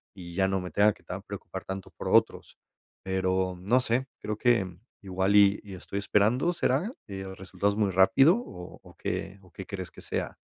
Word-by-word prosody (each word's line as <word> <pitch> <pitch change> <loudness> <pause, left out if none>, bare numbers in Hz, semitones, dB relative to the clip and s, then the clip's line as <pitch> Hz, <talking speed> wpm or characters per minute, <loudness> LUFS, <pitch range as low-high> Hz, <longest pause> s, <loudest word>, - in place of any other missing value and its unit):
y 85 -3 -9
ya 95 -1 +3
no 95 -1 0
me 90 - -7
tenga 105 0 +4
que - - -24
tan - - -6
preocupar - - -8
tanto 95 0 -6
por - - -5
otros. - - +2 0.5
Pero 95 -1 0
no 110 +8 +3
sé, 125 +2 0
creo 105 0 -3
que 105 -8 +2 0.2
igual 95 +1 0
y 100 0 +6
y 100 -2 -10
estoy 95 +2 -6
esperando, 110 - +2
¿será 205 +6 0
eh, 95 -2 -6
resultados 100 +2 -1
muy 105 -2 +1
rápido 135 - +5
o 90 - -9
o - - -16
qué 95 +1 -4
o 90 -2 -20
qué 95 - -8
crees 95 -3 -6
que - - -13
sea? - - -4
95 Hz, 195 wpm, -28 LUFS, 95-105 Hz, 0.5 s, y